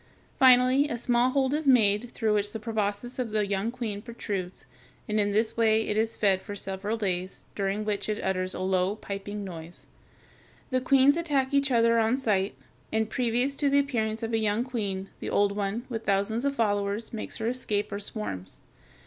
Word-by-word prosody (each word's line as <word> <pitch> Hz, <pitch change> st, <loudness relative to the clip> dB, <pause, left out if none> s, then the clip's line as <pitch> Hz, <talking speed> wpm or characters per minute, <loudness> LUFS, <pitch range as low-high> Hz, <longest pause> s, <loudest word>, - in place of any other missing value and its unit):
Finally 255 Hz, +2 st, +6 dB
a 240 Hz, -, -2 dB
small 240 Hz, +1 st, +2 dB
hole 265 Hz, 0 st, +1 dB
is 300 Hz, 0 st, -1 dB
made, 225 Hz, -3 st, +4 dB
through 220 Hz, -2 st, 0 dB
which 205 Hz, 0 st, 0 dB
the 220 Hz, -, -4 dB
proboscis 215 Hz, +2 st, -3 dB
of 245 Hz, -3 st, -1 dB
the 215 Hz, -1 st, 0 dB
young 200 Hz, +2 st, -1 dB
queen 230 Hz, -4 st, -4 dB
protrudes, 200 Hz, -, -5 dB, 0.4 s
and 215 Hz, 0 st, 0 dB
in 205 Hz, 0 st, +1 dB
this 220 Hz, +2 st, +1 dB
way 220 Hz, -1 st, +3 dB
it 210 Hz, -, 0 dB
is 225 Hz, +1 st, +1 dB
fed 195 Hz, -3 st, +2 dB
for 205 Hz, -, -7 dB
several 200 Hz, +3 st, -3 dB
days, 185 Hz, -3 st, -3 dB
during 200 Hz, +1 st, -1 dB
which 210 Hz, 0 st, -2 dB
it 215 Hz, -, -1 dB
utters 185 Hz, -1 st, -1 dB
a -, -, -5 dB
low, 185 Hz, +1 st, +1 dB
piping 205 Hz, 0 st, -6 dB
noise. 170 Hz, -2 st, -8 dB, 0.9 s
The 255 Hz, 0 st, +1 dB
queens 275 Hz, +3 st, +5 dB
attack 285 Hz, -5 st, 0 dB
each 280 Hz, -1 st, +3 dB
other 230 Hz, -2 st, +4 dB
on 225 Hz, +3 st, +2 dB
sight, 205 Hz, -7 st, 0 dB, 0.4 s
and 220 Hz, 0 st, 0 dB
previous 250 Hz, +2 st, +1 dB
to 285 Hz, -1 st, +2 dB
the 280 Hz, -, +3 dB
appearance 230 Hz, -6 st, 0 dB
of 225 Hz, 0 st, -3 dB
a 225 Hz, -, +2 dB
young 215 Hz, +1 st, +1 dB
queen 200 Hz, -6 st, -3 dB
the -, -, -4 dB
old 205 Hz, 0 st, +2 dB
one, 205 Hz, +4 st, -3 dB
with 225 Hz, -3 st, -4 dB
thousands 200 Hz, +5 st, +1 dB
of 280 Hz, 0 st, 0 dB
followers, 205 Hz, -1 st, -1 dB
makes 220 Hz, -, -5 dB
her 220 Hz, -, -4 dB
escape, 210 Hz, -4 st, -1 dB
or 200 Hz, -, -3 dB
swarms. 150 Hz, -, -5 dB
220 Hz, 190 wpm, -27 LUFS, 200-245 Hz, 0.9 s, Finally